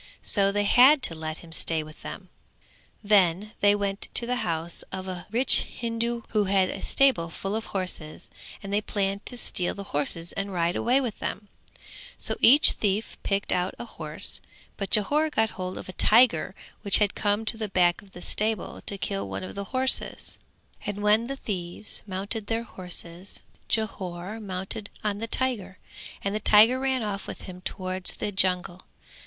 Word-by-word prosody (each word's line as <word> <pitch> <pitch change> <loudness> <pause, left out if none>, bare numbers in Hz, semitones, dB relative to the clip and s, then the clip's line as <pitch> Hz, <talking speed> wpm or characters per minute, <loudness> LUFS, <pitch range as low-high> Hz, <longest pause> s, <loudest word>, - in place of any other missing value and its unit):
So 200 -1 +3
they 205 +1 0
had 260 +7 +6
to - - +1
let 155 0 -5
him 165 - -15
stay 165 -1 -2
with 155 0 -14
them. - - -8 0.7
Then 200 -1 +3
they 205 0 +5
went 200 -1 -3
to 235 - +7
the 250 +1 -1
house 165 -4 -2
of 190 0 -5
a 180 -1 -6
rich 245 +5 +6
Hindu 235 0 -3
who 210 -2 +1
had 190 -1 +2
a - - -7
stable 260 -12 +2
full 195 +5 -4
of 225 - -4
horses 180 -5 -5 0.3
and 200 0 -5
they 205 - +2
planned 200 -1 -2
to 245 - +3
steal 180 -6 -1
the 200 - -6
horses 165 +4 -1
and 200 0 -3
ride 175 -1 0
away 250 +3 +2
with 240 -5 -4
them; 205 0 -5 0.7
so - - -3
each 285 +6 +8
thief 205 +1 -1
picked 200 0 -1
out 180 +1 0
a - - -7
horse, - - -4 0.3
but 195 -2 -4
Jhore 290 - +2
got 220 -6 +1
hold 185 0 -5
of - - -8
a 185 - -7
tiger 210 -5 +4 0.3
which 200 -3 +4
had 205 -2 +2
come 205 +1 0
to 225 - +1
the 220 -2 -4
back 175 -2 +2
of 195 -1 -20
the 175 - -10
stable 215 -2 -2
to 200 - -3
kill 195 0 -3
one - - -5
of 185 - -7
the 200 0 -5
horses; 260 +4 +3 0.4
and 205 0 -4
when 215 +3 +3
the 275 - -3
thieves 190 -4 -3
mounted 200 +3 -3
their 230 0 -1
horses, 180 -2 -9 0.3
Jhore 195 -2 -3
mounted 195 +1 -5
on 205 -1 -1
the 230 - -4
tiger, 220 -7 -1 0.5
and 200 - -1
the 215 - -1
tiger 220 +5 +6
ran 265 -2 0
off 205 -1 -4
with - - -7
him 180 -2 -9
towards 185 0 +1
the 205 - -3
jungle. 185 -2 0
200 Hz, 180 wpm, -26 LUFS, 185-220 Hz, 0.7 s, each